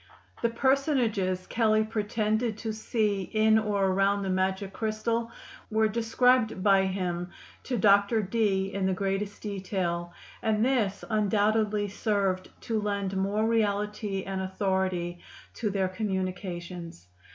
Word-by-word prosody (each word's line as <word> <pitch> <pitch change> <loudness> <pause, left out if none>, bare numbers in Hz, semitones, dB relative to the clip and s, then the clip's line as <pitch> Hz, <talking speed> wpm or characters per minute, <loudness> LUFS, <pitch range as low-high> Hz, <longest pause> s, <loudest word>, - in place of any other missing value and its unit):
The 235 - +2
personages 230 -8 +1
Kelley 215 -2 +2
pretended 215 +1 -1
to 220 -1 -4
see 215 -2 0
in 220 +3 +3
or 205 -2 0
around 195 +1 +2
the 190 - -1
magic 190 +1 -1
crystal 230 +1 -1 0.4
were 220 0 +3
described 225 -1 +2
by 195 -2 +5
him 180 -2 -2 0.4
to 250 - -1
Dr. 205 +1 +4
Dee 195 -2 0
in 195 -1 0
the 190 - +1
greatest 195 +1 -2
detail, 185 -4 -2 0.3
and 220 -1 +2
this 230 -7 0
undoubtedly 215 -1 +1
served 195 -2 -1
to 225 -2 -1
lend 200 -2 -2
more 200 +3 +1
reality 210 -2 0
and 190 -1 -3
authority 185 -2 -1 0.3
to 220 - -2
their 195 -1 0
communications. 180 - -4
205 Hz, 125 wpm, -28 LUFS, 190-220 Hz, 0.4 s, by